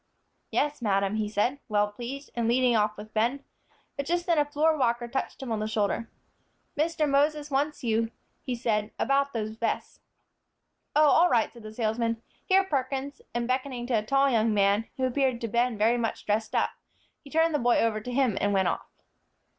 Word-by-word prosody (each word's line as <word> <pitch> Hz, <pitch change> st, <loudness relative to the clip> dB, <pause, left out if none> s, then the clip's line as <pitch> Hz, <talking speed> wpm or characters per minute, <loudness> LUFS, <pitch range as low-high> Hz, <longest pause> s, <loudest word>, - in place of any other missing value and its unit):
"Yes, 295 Hz, -2 st, 0 dB
madam," 200 Hz, -1 st, +1 dB
he 215 Hz, -1 st, -1 dB
said, 230 Hz, +7 st, 0 dB
well 210 Hz, -1 st, +2 dB
pleased, 245 Hz, +6 st, -7 dB
and 235 Hz, -1 st, 0 dB
leading 245 Hz, 0 st, +3 dB
off 210 Hz, -1 st, +1 dB
with 215 Hz, +1 st, -10 dB
Ben. 240 Hz, +6 st, 0 dB, 0.5 s
But 280 Hz, -1 st, -4 dB
just 345 Hz, +1 st, 0 dB
then 335 Hz, -3 st, +3 dB
a 295 Hz, -, +3 dB
floor 305 Hz, +2 st, +2 dB
walker 240 Hz, -4 st, 0 dB
touched 265 Hz, +2 st, -4 dB
him 250 Hz, -, -5 dB
on 220 Hz, -, 0 dB
the 215 Hz, -, -2 dB
shoulder, 220 Hz, +1 st, -1 dB, 0.7 s
"Mr. 310 Hz, 0 st, +1 dB
Moses 295 Hz, +1 st, +1 dB
wants 285 Hz, +2 st, -1 dB
you," 225 Hz, -1 st, +1 dB, 0.3 s
he 255 Hz, -, -3 dB
said, 215 Hz, -3 st, 0 dB
"about 280 Hz, +1 st, +1 dB
those 215 Hz, -3 st, -3 dB
vests." 230 Hz, -, -3 dB, 1.0 s
"Oh, 305 Hz, 0 st, +6 dB
all 340 Hz, +5 st, +5 dB
right," 230 Hz, -2 st, +2 dB
said 235 Hz, -, -13 dB
the 215 Hz, 0 st, -9 dB
salesman; 230 Hz, +1 st, -1 dB, 0.2 s
"here, 385 Hz, 0 st, +4 dB
Perkins," 275 Hz, -4 st, -3 dB
and 240 Hz, 0 st, -1 dB
beckoning 255 Hz, -1 st, -2 dB
to 250 Hz, -, -3 dB
a 220 Hz, -, +3 dB
tall 275 Hz, +5 st, +3 dB
young 225 Hz, -4 st, +2 dB
man, 200 Hz, +2 st, +2 dB
who 260 Hz, -, +1 dB
appeared 255 Hz, -1 st, +1 dB
to 230 Hz, -, -2 dB
Ben 235 Hz, +1 st, +1 dB
very 230 Hz, +3 st, +3 dB
much 225 Hz, -1 st, -3 dB
dressed 215 Hz, +1 st, -1 dB
up, -, -, +2 dB, 0.5 s
he 280 Hz, -, -13 dB
turned 320 Hz, +2 st, +2 dB
the 295 Hz, -, +2 dB
boy 240 Hz, 0 st, +3 dB
over 220 Hz, -2 st, +1 dB
to 250 Hz, -, -6 dB
him, 250 Hz, -5 st, +1 dB
and 205 Hz, 0 st, +1 dB
went 190 Hz, -2 st, +3 dB
off. -, -, -4 dB
240 Hz, 195 wpm, -27 LUFS, 220-280 Hz, 1.0 s, Oh